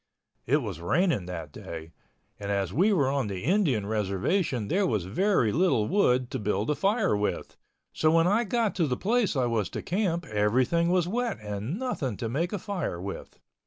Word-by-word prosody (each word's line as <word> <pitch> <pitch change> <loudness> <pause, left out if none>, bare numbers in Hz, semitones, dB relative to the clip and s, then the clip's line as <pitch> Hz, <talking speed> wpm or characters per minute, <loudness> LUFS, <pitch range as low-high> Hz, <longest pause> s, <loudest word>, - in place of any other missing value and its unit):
It 145 +3 +2
was 95 -7 -5
raining 105 - +1
that 85 -5 -6
day, 80 +1 -8 0.5
and 100 -1 -5
as 100 -3 -1
we 190 - +3
were 150 -10 +3
on 135 -3 0
the 95 -3 -5
Indian 160 - +2
reservation 110 - 0
there 195 - +1
was 105 - -1
very 125 - +2
little 145 - +2
wood 125 -10 +2
to - - -2
build 105 +4 0
a - - +1
fire 200 - +1
with, 105 0 -2 0.4
so 155 - +2
when 165 +1 +4
I 205 +6 +3
got 230 0 0
to 165 -4 +2
the 125 -2 -1
place 220 -3 +1
I 130 -2 +2
was 115 -6 0
to - - -6
camp 175 -3 -1
everything 125 +9 +1
was 180 -1 +2
wet 235 +3 -1
and 105 - -4
nothing 155 - -3
to 115 - -3
make 155 +10 -1
a 205 - -1
fire 180 - -3
with. 95 +2 -7
135 Hz, 195 wpm, -27 LUFS, -, 0.5 s, when